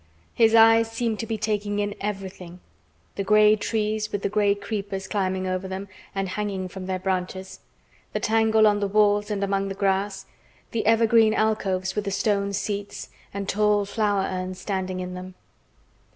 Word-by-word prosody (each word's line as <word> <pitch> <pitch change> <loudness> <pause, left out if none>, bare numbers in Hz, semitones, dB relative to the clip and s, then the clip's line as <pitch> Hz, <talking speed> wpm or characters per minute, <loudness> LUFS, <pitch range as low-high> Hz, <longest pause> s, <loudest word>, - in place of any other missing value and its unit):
His 225 -1 +4
eyes 225 0 +6
seemed 225 -1 -2
to 225 - -4
be 225 0 -2
taking 210 -1 -1
in 205 0 -1
everything—the 180 - -8
gray 210 +1 +5
trees 215 0 -2
with 205 - -3
the - - +1
gray 205 0 +2
creepers 200 -2 -4
climbing 190 -2 -1
over 185 0 -2
them 190 +1 -5 0.3
and 195 0 -1
hanging 195 -1 -3
from 185 0 -8
their 185 -1 -1
branches, 190 0 -3 0.5
the - - -2
tangle 220 0 +3
on 205 -1 +4
the 200 - 0
walls 205 0 +3
and 200 -1 -1
among 195 0 0
the 195 - -4
grass, 195 0 -1 0.5
the 220 -2 -1
evergreen 225 -1 +4
alcoves 190 -4 0
with 210 -1 -2
the - - -1
stone 200 0 0
seats 200 0 -4 0.2
and 200 0 -5
tall 210 0 +2
flower 205 -1 0
urns 185 0 -4
standing 185 -2 -3
in 180 0 -5
them. 185 0 -8
200 Hz, 165 wpm, -25 LUFS, 190-215 Hz, 0.5 s, eyes